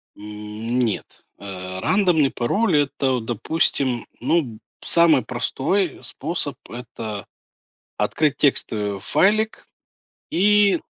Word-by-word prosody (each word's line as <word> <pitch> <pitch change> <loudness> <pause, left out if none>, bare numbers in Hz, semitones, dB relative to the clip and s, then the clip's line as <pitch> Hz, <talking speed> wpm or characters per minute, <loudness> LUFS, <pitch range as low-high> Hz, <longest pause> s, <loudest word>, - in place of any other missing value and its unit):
Нет, 105 +2 -4 0.2
э, 95 -2 -6
рандомный 175 - +3
пароль- 170 - +1
это, 140 -2 0
вот 120 -3 -1
допустим, 125 0 0
ну, 165 +7 +2
б 115 -5 -9 0.2
самый 165 -5 +4
простой 135 +7 -1
способ- 145 +1 -3
это 110 -3 -6 0.7
открыть 150 -3 +1
текстовый 105 -7 0
файлик 215 - +1 0.6
и 205 -1 +4
130 Hz, 95 wpm, -22 LUFS, 110-170 Hz, 0.7 s, самый